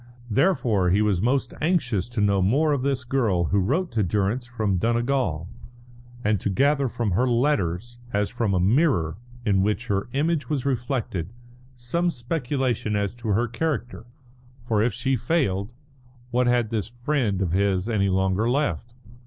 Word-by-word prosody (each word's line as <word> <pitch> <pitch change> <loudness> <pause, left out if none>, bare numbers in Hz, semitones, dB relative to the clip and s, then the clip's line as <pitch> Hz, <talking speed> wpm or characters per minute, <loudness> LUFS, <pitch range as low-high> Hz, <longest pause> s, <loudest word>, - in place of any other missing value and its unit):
Therefore 115 - +2
he 100 +4 +3
was 100 -4 +1
most 125 +2 0
anxious 125 - 0
to 120 -3 -2
know 100 -1 +3
more 145 +11 +3
of 140 - 0
this 135 -1 -1
girl 120 -8 +1
who 100 - +2
wrote 150 - 0
to 115 - 0
Durrance 105 +6 0
from 110 -6 -1
Donegal, 115 - 0 0.8
and 105 -1 +2
to - - -1
gather 140 +7 +2
from 115 -3 -2
her 120 +9 +2
letters, 120 - 0
as 105 0 0
from 115 -5 0
a - - +2
mirror 100 - +2 0.3
in 100 -3 +3
which 105 +4 0
her 100 +2 -1
image 150 -1 0
was 140 -4 -1
reflected, 120 - -2 0.4
some 150 +9 -1
speculation 125 -5 -2
as 100 0 -1
to 120 -1 -8
her 110 +4 +2
character. 120 -2 -3 0.5
For 115 -3 0
if 115 +2 +2
she 135 +6 0
failed, 115 - 0 0.6
what 125 +1 +2
had 120 -2 +2
this 110 -3 -1
friend 120 -4 -1
of 95 -4 0
his 95 +1 +1
any 100 -4 +1
longer 95 +4 +1
left? 120 - -1
115 Hz, 160 wpm, -24 LUFS, 100-130 Hz, 0.8 s, he